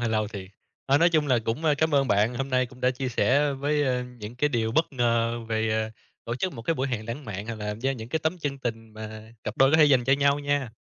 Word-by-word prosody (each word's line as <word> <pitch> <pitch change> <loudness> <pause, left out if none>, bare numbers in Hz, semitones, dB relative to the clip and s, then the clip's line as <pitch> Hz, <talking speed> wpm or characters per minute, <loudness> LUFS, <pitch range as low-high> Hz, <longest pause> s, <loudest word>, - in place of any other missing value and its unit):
hơi 120 - 0
lâu 110 -2 0
thiệt. 100 -4 -7 0.4
Ờ, 140 +1 +4
nói 170 - +5
chung 155 -3 +2
là 130 -3 +3
cũng, 115 +8 -3
a, 150 - +4
cám 160 +1 +1
ơn 135 -2 +3
bạn, 105 +4 +2
hôm 135 +2 -3
nay 130 0 +2
cũng 120 - -16
đã 125 0 +3
chia 130 +1 -3
sẻ 140 +4 +2
với, 145 +2 0
a, 125 -1 0 0.2
những 105 +3 -8
cái 150 +4 +2
điều 115 -4 -1
bất 160 +2 +1
ngờ 115 -2 +1
về, 110 0 0
à, 110 0 0 0.3
tổ 115 - -3
chức 185 +7 -2
một 115 -5 -8
cái 165 - 0
buổi 135 -1 -1
hẹn 110 -4 -3
lãng 125 +5 -5
mạn 105 -1 -6
hoặc 115 - -4
là 105 -1 -4
gieo 130 +5 -1
những 115 -3 -7
cái 160 - 0
tấm 160 +3 -1
chân 145 -4 -3
tình 115 -3 -5
mà 110 +1 -9
cặp 105 - -4
đôi 135 +1 +5
có 155 - +5
thể 155 - +7
dành 130 -4 +4
cho 135 - +3
nhau 140 +1 +3
nha. 145 -4 -1
125 Hz, 290 wpm, -26 LUFS, 110-140 Hz, 0.4 s, thể